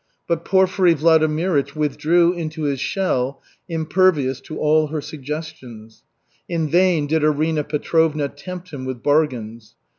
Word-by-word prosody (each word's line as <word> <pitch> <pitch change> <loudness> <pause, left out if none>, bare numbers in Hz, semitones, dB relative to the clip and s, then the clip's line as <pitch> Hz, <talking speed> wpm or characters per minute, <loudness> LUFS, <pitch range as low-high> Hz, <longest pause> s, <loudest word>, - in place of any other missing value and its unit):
But 170 -1 -1
Porfiry 190 -2 +3
Vladimirych 155 -1 +2
withdrew 155 +4 +2
into 160 -2 -5
his 140 -2 -1
shell, 135 -9 -1 0.3
impervious 160 -5 +1
to 155 +3 -8
all 155 0 +2
her 155 +1 -4
suggestions. 135 -7 -8 0.5
In 165 -2 -1
vain 175 -1 +3
did 155 +1 0
Arina 155 +1 +1
Petrovna 155 0 0
tempt 180 +5 -9
him 140 -3 -7
with 130 -2 -6
bargains. 120 -7 -1
155 Hz, 125 wpm, -21 LUFS, 140-165 Hz, 0.5 s, Porfiry